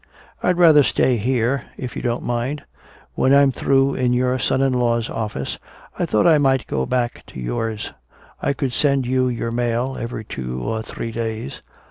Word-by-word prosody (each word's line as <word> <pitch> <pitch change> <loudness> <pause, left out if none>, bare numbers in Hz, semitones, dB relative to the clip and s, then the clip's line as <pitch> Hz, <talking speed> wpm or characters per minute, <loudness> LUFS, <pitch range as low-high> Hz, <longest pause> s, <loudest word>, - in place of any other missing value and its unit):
"I'd 180 - +1
rather 160 -4 +7
stay 130 -2 +2
here, 125 +3 0
if 125 -2 -6
you - - -4
don't 120 -1 -1
mind. 120 +5 -2 0.5
When 135 +1 +3
I'm 140 -1 +5
through 135 +1 +2
in 125 -1 +1
your 125 +1 +1
son 130 - +1
in 135 -1 +2
law's 120 -2 0
office 105 -12 -4 0.4
I - - 0
thought 105 - +2
I 160 -3 +6
might 135 -2 +2
go 65 - -2
back 120 -2 -1
to - - -10
yours. 105 - -3 0.5
I - - +1
could 135 -3 -2
send 140 -2 +2
you 130 +1 +1
your 115 -1 -2
mail 120 +2 -1
every 115 -2 -5
two 65 -7 -5
or 110 - -2
three 115 +1 -6
days." 110 -8 -4
125 Hz, 180 wpm, -21 LUFS, 115-135 Hz, 0.5 s, rather